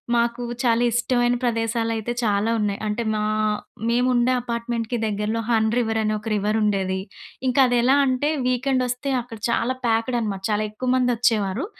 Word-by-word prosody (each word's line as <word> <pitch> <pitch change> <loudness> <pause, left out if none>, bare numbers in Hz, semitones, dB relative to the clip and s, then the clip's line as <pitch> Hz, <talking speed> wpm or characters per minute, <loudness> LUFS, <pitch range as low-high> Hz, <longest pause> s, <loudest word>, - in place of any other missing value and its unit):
మాకు 235 +1 0 0.2
చాలా 235 -2 +2
ఇష్టమైన 245 +1 +1
ప్రదేశాలయితే 230 -1 -1
చాలా 210 0 +1
ఉన్నాయి. 205 -2 -1
అంటే 210 +3 -1
మా 215 - -1 0.7
మేముండే 245 +1 +2
అపార్ట్‌మెంట్‌కి 235 0 -3
దగ్గరలో 210 +1 -1
'హన్ 220 -2 +2
రివర్' 225 -2 0
అని 215 0 0
ఒక 215 - -9
రివర్ 210 +1 0
ఉండేది. 195 -3 0 0.5
ఇంకా 255 +2 +3
అది 245 - +2
ఎలా 265 +3 +4
అంటే 260 +3 +1 0.2
వీకెండ్ 255 +1 +1
వస్తే 250 +3 -3
అక్కడ 230 -2 -10
చాలా 235 +2 0
ప్యాక్డ్ 230 +2 +1
అనమాట. 205 -4 -3
చాలా 210 0 +1
ఎక్కువ 250 +4 -4
మంది 250 -1 +2
వచ్చేవారు. 225 - +1
230 Hz, 160 wpm, -23 LUFS, 215-245 Hz, 0.7 s, ఎలా